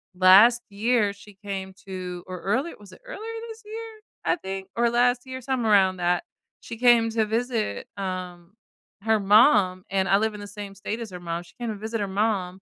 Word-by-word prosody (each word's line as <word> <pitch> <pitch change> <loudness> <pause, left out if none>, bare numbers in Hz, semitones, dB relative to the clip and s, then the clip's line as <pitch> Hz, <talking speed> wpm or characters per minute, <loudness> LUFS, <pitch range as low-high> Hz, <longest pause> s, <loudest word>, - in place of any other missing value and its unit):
last 200 +6 +7
year 210 0 +1
she 205 0 -15
came 195 -1 -6
to 180 -2 -6
or 185 -1 -6
early 260 - 0
was 205 -1 -15
it - - -16
earlier 455 -2 -7
this 450 +1 -10
year, 445 0 -8 0.3
I - - +3
think, 190 -5 -6
or 235 0 +3
last 245 +1 +2
year, 260 0 -7
somewhere 245 -4 0
around 190 -2 +4
that. 175 0 +1 0.4
She 230 - -8
came 235 -2 +5
to 220 -1 +1
visit, 225 - -2
um, 185 -1 -5 0.5
her 220 -1 +3
mom, 200 -3 +5
and 190 -1 0
I 195 - +5
live 220 0 0
in 210 - -8
the 205 - -8
same 205 -1 -8
state 210 +4 -5
as 225 - -6
her 180 - -8
mom. 170 -1 -4
She 175 - -20
came 235 - -3
to 215 - -3
visit 220 +2 -4
her 205 - -1
mom, 195 -2 -1
205 Hz, 205 wpm, -25 LUFS, 190-235 Hz, 0.5 s, last